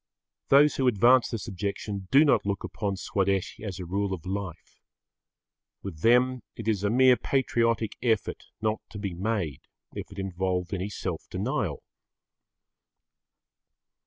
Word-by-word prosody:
Those 145 Hz, +1 st, +5 dB
who 130 Hz, -, +2 dB
advance 120 Hz, +2 st, +5 dB
this 115 Hz, +1 st, -5 dB
objection 100 Hz, -1 st, -4 dB
do 140 Hz, +3 st, +6 dB
not 125 Hz, -7 st, +3 dB
look 100 Hz, 0 st, -2 dB
upon 100 Hz, -2 st, -3 dB
Swadeshi 95 Hz, +1 st, -1 dB
as 100 Hz, -4 st, -5 dB
a 90 Hz, -, -5 dB
rule 95 Hz, +2 st, -1 dB
of 80 Hz, -, -14 dB
life. 95 Hz, -3 st, -6 dB, 1.0 s
With 90 Hz, -6 st, -7 dB
them 125 Hz, +5 st, +3 dB
it 115 Hz, -, -7 dB
is 105 Hz, -3 st, +1 dB
a 100 Hz, -, +2 dB
mere 130 Hz, +2 st, +6 dB
patriotic 115 Hz, -5 st, 0 dB
effort 115 Hz, -3 st, 0 dB, 0.2 s
not 110 Hz, 0 st, 0 dB
to -, -, -9 dB
be 100 Hz, -3 st, -4 dB
made 90 Hz, -, -2 dB, 0.3 s
if -, -, -7 dB
it 100 Hz, -, -12 dB
involved 95 Hz, -1 st, -2 dB
any 95 Hz, +1 st, -2 dB
self 95 Hz, -4 st, -5 dB
denial. -, -, -2 dB
100 Hz, 140 wpm, -27 LUFS, 95-115 Hz, 1.0 s, do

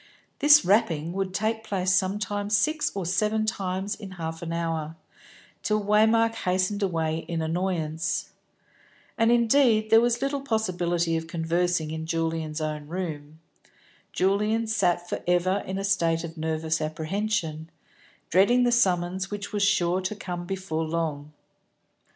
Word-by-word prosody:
This 295 Hz, +1 st, +7 dB
rapping 170 Hz, -5 st, +2 dB
would 195 Hz, 0 st, -2 dB
take 220 Hz, +3 st, -1 dB
place 190 Hz, -3 st, 0 dB
sometimes 205 Hz, +2 st, 0 dB
six 305 Hz, +8 st, +1 dB
or 195 Hz, -3 st, -3 dB
seven 215 Hz, +5 st, +1 dB
times 195 Hz, -1 st, -2 dB
in 200 Hz, -2 st, -9 dB
half 165 Hz, -2 st, -5 dB
an 170 Hz, -1 st, -5 dB
hour, 165 Hz, -2 st, -2 dB, 0.7 s
till 215 Hz, -1 st, +1 dB
Waymark 220 Hz, +2 st, +4 dB
hastened 185 Hz, 0 st, -1 dB
away 165 Hz, -4 st, 0 dB
in 170 Hz, -1 st, -2 dB
annoyance. 165 Hz, 0 st, -2 dB, 0.8 s
And 225 Hz, +1 st, +3 dB
indeed 235 Hz, -2 st, +3 dB
there 225 Hz, 0 st, +7 dB
was 240 Hz, 0 st, +1 dB
little 275 Hz, +1 st, -1 dB
possibility 175 Hz, -9 st, 0 dB
of 160 Hz, 0 st, -5 dB
conversing 170 Hz, -1 st, 0 dB
in 160 Hz, 0 st, -5 dB
Julian's 165 Hz, -1 st, -2 dB
own 150 Hz, -1 st, -4 dB
room. 160 Hz, -3 st, -6 dB, 0.7 s
Julian 210 Hz, +4 st, +1 dB
sat 180 Hz, -5 st, 0 dB
for -, -, -4 dB
ever 180 Hz, +2 st, +2 dB
in 190 Hz, +1 st, -3 dB
a 195 Hz, -, -3 dB
state 170 Hz, -4 st, +1 dB
of 165 Hz, 0 st, -7 dB
nervous 160 Hz, 0 st, -1 dB
apprehension, 160 Hz, 0 st, -2 dB, 0.6 s
dreading 220 Hz, +8 st, +4 dB
the 245 Hz, -, +3 dB
summons 185 Hz, -4 st, +1 dB
which 205 Hz, 0 st, -6 dB
was 205 Hz, -, -1 dB
sure 185 Hz, -2 st, +2 dB
to 185 Hz, +3 st, -3 dB
come 175 Hz, -3 st, -6 dB
before 185 Hz, -4 st, -3 dB
long. 155 Hz, -2 st, -3 dB
185 Hz, 140 wpm, -26 LUFS, 165-210 Hz, 0.8 s, This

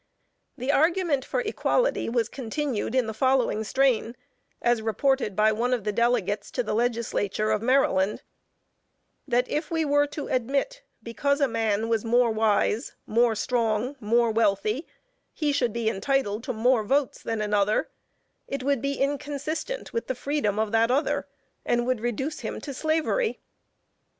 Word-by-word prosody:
The 255 Hz, +3 st, 0 dB
argument 320 Hz, -2 st, +2 dB
for -, -, -2 dB
equality -, -, 0 dB
was 230 Hz, -1 st, +1 dB
continued 260 Hz, -1 st, -3 dB
in 255 Hz, -2 st, +3 dB
the 220 Hz, -, -4 dB
following 255 Hz, -2 st, +1 dB
strain, 245 Hz, 0 st, +1 dB, 0.4 s
as 240 Hz, -1 st, +2 dB
reported 225 Hz, 0 st, 0 dB
by 215 Hz, +1 st, +4 dB
one 240 Hz, +4 st, +1 dB
of 235 Hz, -, -6 dB
the 210 Hz, -, -1 dB
delegates, 215 Hz, -3 st, 0 dB
to 250 Hz, -, 0 dB
the 215 Hz, -, -3 dB
Legislature 220 Hz, -2 st, 0 dB
of 215 Hz, -1 st, +1 dB
Maryland: 225 Hz, -6 st, +2 dB, 1.0 s
"That 250 Hz, -1 st, +2 dB
if 300 Hz, +1 st, -2 dB
we 325 Hz, -1 st, 0 dB
were 290 Hz, 0 st, +3 dB
to 290 Hz, 0 st, -6 dB
admit, 275 Hz, -, -1 dB, 0.2 s
because 280 Hz, +5 st, 0 dB
a 280 Hz, -, +3 dB
man 225 Hz, -2 st, 0 dB
was 225 Hz, -2 st, 0 dB
more 240 Hz, 0 st, +3 dB
wise, 220 Hz, +2 st, +1 dB
more 230 Hz, 0 st, +2 dB
strong, 230 Hz, +3 st, 0 dB
more 235 Hz, +1 st, +2 dB
wealthy, 215 Hz, -, +1 dB, 0.5 s
he 300 Hz, -2 st, 0 dB
should 255 Hz, -5 st, +1 dB
be 230 Hz, 0 st, -2 dB
entitled 220 Hz, 0 st, 0 dB
to 260 Hz, -, -2 dB
more 235 Hz, +1 st, +2 dB
votes 275 Hz, +5 st, 0 dB
than 225 Hz, -1 st, -3 dB
another, 210 Hz, 0 st, +1 dB, 0.6 s
it 275 Hz, -1 st, -4 dB
would 280 Hz, -3 st, +1 dB
be 280 Hz, 0 st, -1 dB
inconsistent 290 Hz, -, -3 dB
with 465 Hz, -, -2 dB
the 260 Hz, -, -2 dB
freedom 260 Hz, -6 st, -1 dB
of 220 Hz, -1 st, 0 dB
that 225 Hz, +1 st, +3 dB
other, 275 Hz, +5 st, 0 dB, 0.4 s
and 240 Hz, 0 st, +1 dB
would 255 Hz, -2 st, 0 dB
reduce 240 Hz, +6 st, -2 dB
him -, -, -5 dB
to 280 Hz, -, -6 dB
slavery." 320 Hz, -, 0 dB
240 Hz, 155 wpm, -26 LUFS, 220-280 Hz, 1.0 s, by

